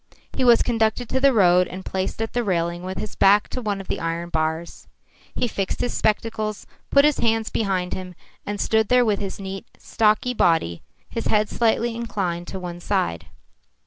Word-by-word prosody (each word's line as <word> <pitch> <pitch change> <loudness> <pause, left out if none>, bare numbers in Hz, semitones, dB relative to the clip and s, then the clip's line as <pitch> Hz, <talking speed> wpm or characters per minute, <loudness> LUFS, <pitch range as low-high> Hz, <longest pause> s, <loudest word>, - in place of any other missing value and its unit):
He 260 - -1
was 240 -2 +6
conducted 225 0 0
to 260 - +1
the 275 +1 +5
road 180 -5 +4
and 185 +1 -8
placed 190 +4 -2
at 225 - -5
the 240 - 0
railing 170 -3 -1
with 185 +1 -6
his 215 - -5
back 200 +1 +4
to 255 - -4
one 205 -3 -2
of 195 - -9
the - - -2
iron 165 +1 -3
bars. 160 +1 -3 0.5
He 245 - 0
fixed 195 -3 -3
his 245 - -1
spectacles, 215 -1 -1 0.2
put 280 0 +5
his 300 -1 +2
hands 225 -1 +1
behind 190 -4 -1
him, 185 -1 -6 0.3
and 205 0 -4
stood 220 +1 +2
there 250 +1 +4
with 210 -3 +1
his 195 -1 -5
neat, 195 +3 -6
stocky 220 +3 +1
body, 160 - +1 0.3
his 230 - -4
head 210 0 +2
slightly 235 0 +1
inclined 190 -7 -3
to 190 - -6
one 175 -1 -6
side. 85 - -1
205 Hz, 190 wpm, -23 LUFS, 180-225 Hz, 0.5 s, was